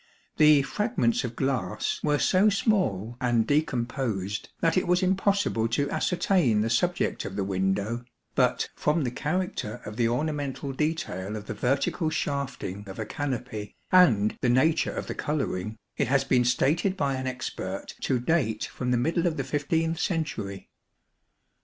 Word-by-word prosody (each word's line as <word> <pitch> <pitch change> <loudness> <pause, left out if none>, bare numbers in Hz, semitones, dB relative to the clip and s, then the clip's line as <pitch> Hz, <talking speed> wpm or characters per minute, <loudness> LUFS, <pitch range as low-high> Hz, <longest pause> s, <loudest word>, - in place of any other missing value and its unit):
The 150 -2 +6
fragments 135 - 0
of 120 -1 -4
glass 130 -9 -1
were 150 -1 +2
so 190 +7 +4
small 150 - 0
and 120 -3 +2
decomposed 120 -8 -1
that 165 -1 +2
it 185 - +1
was 180 +1 +3
impossible 190 - +2
to 140 +5 0
ascertain 175 - +2
the 115 +1 0
subject 175 +9 +1
of 95 - -6
the 100 - -1
window, 100 +5 -1 0.3
but - - +2
from 150 +1 +1
the 125 - -1
character 150 - -2
of 105 +1 -7
the 120 -2 +3
ornamental 140 +1 -2
detail 130 - -2
of 105 -1 -6
the - - -4
vertical 135 - 0
shafting 135 - -3
of 95 - -8
a 110 - -3
canopy 125 -5 -4 0.2
and 115 - +5
the 125 - +2
nature 155 +7 +3
of - - -4
the - - -4
colouring, 110 -8 -2 0.2
it 140 - +1
has 135 +1 +3
been 125 -2 +2
stated 160 +10 +2
by 140 -5 +1
an 130 0 -3
expert 100 -7 -5
to 130 - +1
date 125 -5 0
from 125 - -4
the 125 - +3
middle 165 +7 +1
of 160 - -1
the 135 - -1
loth 160 +4 0
century. 130 - -2
135 Hz, 160 wpm, -27 LUFS, 110-160 Hz, 0.3 s, The